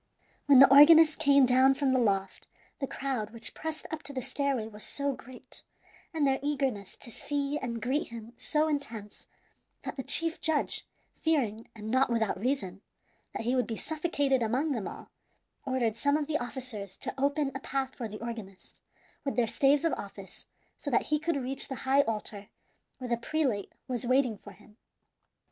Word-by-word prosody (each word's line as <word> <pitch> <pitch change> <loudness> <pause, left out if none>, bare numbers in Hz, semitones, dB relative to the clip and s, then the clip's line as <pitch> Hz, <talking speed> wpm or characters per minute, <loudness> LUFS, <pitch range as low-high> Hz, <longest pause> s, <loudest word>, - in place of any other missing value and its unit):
When 280 -2 +8
the 270 +1 +9
organist 310 +1 +8
came 280 -3 +6
down 260 +2 +5
from 275 -1 +1
the 260 - +3
loft 195 -4 0 0.3
the 275 - -2
crowd 260 -7 -3
which 230 -1 -6
pressed 320 -1 -5
up 315 -1 -4
to 280 -1 -6
the 260 - -3
stairway 275 -6 -1
was 210 -1 -11
so 280 -1 -2
great, 255 0 -9 0.5
and 315 -3 +1
their 270 -1 +2
eagerness 270 -9 -2
to 235 - -12
see 285 +3 -2
and 235 -3 -4
greet 260 +6 -1
him 230 0 -9
so 305 +5 0
intense, 230 -9 -4 0.6
that - - -5
the - - -1
chief 330 +4 +1
judge, 320 -2 0 0.3
fearing, 240 -9 0
and 215 0 -6
not 260 +1 +3
without 225 -5 0
reason, 195 -6 -2 0.5
that - - -4
he 245 +3 +1
would 250 -3 +1
be 225 - -3
suffocated 285 -3 0
among 255 +7 0
them 230 -8 -2
all, - - -9 0.6
ordered 245 -5 0
some 285 +5 +2
of 305 - -2
the 305 +1 -1
officers 245 -6 -5
to - - -5
open 285 0 +1
a 270 - -4
path 270 -1 -3
for 235 - -5
the 215 0 -8
organist, 215 -5 -9 0.4
with 275 - -2
their 245 - +3
staves 280 +6 +3
of 330 - +2
office, - - -8 0.3
so - - -4
that - - +1
he 300 0 +2
could 320 -1 -1
reach 270 +1 -1
the 265 - -4
high 270 +2 +5
altar, 210 -4 -3 0.5
where 255 - -6
the 235 -1 0
prelate 240 -5 -1
was 245 -2 -2
waiting 255 -3 +3
for 205 0 -13
him. 210 0 -20
260 Hz, 185 wpm, -30 LUFS, 230-285 Hz, 0.6 s, the